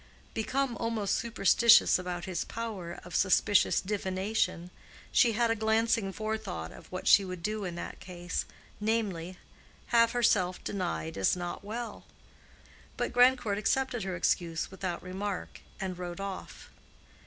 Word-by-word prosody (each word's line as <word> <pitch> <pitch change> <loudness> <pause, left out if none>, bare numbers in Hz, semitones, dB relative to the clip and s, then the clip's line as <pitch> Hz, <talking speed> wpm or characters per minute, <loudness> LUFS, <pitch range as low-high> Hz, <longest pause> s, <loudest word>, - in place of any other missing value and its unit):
Become 255 +3 -1
almost 225 -3 -1
superstitious 235 -1 +5
about 180 -1 -4
his 185 -2 -2
power 210 -7 -6
of 175 - -7
suspicious 200 +1 +4
divination, 190 -2 -1 0.4
she 235 -3 +4
had 235 +1 +2
a - - +2
glancing 220 -2 +1
forethought 215 - -4
of - - -14
what 185 - -5
she 200 - +7
would 185 -3 -6
do 215 0 -2
in 175 -2 -4
that 175 - -6
case—namely, 185 +1 -4 0.5
have 230 -1 +4
herself 195 -7 +2
denied 80 - -3
as 95 - +3
not 175 +1 -5
well. 225 +2 -6 0.9
But - - -2
Grandcourt 245 -4 +4
accepted 260 +2 0
her 190 -1 -3
excuse 170 -1 0
without 185 -2 -4
remark, 190 +1 -5 0.2
and 190 -2 -3
rode 175 0 -6
off. 195 -1 -7
200 Hz, 130 wpm, -30 LUFS, 180-225 Hz, 0.9 s, she